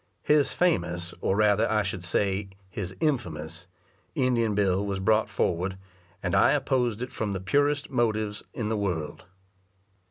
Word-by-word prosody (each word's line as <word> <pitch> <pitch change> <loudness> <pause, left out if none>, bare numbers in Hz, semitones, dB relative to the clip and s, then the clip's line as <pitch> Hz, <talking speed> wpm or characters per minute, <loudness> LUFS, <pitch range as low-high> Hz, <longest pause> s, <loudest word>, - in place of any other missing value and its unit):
His 150 -1 +3
famous, 85 - 0
or 95 - +1
rather 105 +1 +3
I 105 -1 +2
should 95 -2 -4
say 95 +2 0 0.2
his 95 -5 -4
in 150 +3 +1
famous, 80 -2 -8 0.5
Indian 120 -6 +1
bill 100 -1 +2
was 100 -1 -2
brought 110 +3 +2
forward, 90 +2 -1 0.5
and 90 -2 -1
I - - +5
opposed 125 -5 0
it 125 - -6
from 105 -3 -2
the 95 - -2
purest 145 +8 +1
motives 110 -4 0
in 110 -3 -3
the 110 - 0
world. 90 -7 -3
105 Hz, 155 wpm, -27 LUFS, 95-120 Hz, 0.5 s, I